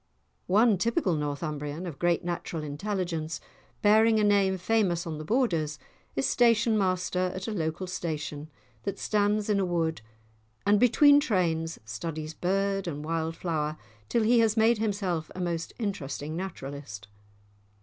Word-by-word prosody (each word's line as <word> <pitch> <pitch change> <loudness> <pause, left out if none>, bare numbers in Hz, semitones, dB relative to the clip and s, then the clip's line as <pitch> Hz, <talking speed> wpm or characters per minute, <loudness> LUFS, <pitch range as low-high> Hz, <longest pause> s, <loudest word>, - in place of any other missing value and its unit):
One 210 +1 +4
typical 230 -4 +1
Northumbrian, 150 +1 -3
of 155 -6 -7
great 175 -1 +2
natural 170 -2 -4
intelligence, 165 +1 -3 0.4
bearing 220 +1 +5
a - - +2
name 200 -2 +3
famous 185 -3 +1
on 160 -2 -5
the - - -5
Borders, 165 - 0 0.4
is 135 - 0
station 230 -2 +3
master 185 -2 0
at 185 +2 -5
a - - -2
local 165 -2 -2
station 155 -4 -4 0.3
that 200 -1 -4
stands 210 0 +1
in 210 -2 +2
a - - +2
wood, 165 -4 -1 0.6
and 205 0 +4
between 285 +5 +6
trains, 170 - 0
studies 155 +6 -5
bird 195 +2 0
and 150 -2 -4
wild 165 0 -2
flower 155 -3 -2 0.3
till 230 - +2
he 235 +2 +4
has 225 -1 +3
made 225 0 +4
himself 195 -7 -1
a - - -6
most 170 -2 -2
interesting 155 - -4
naturalist. 140 - -6
180 Hz, 145 wpm, -28 LUFS, 160-210 Hz, 0.6 s, between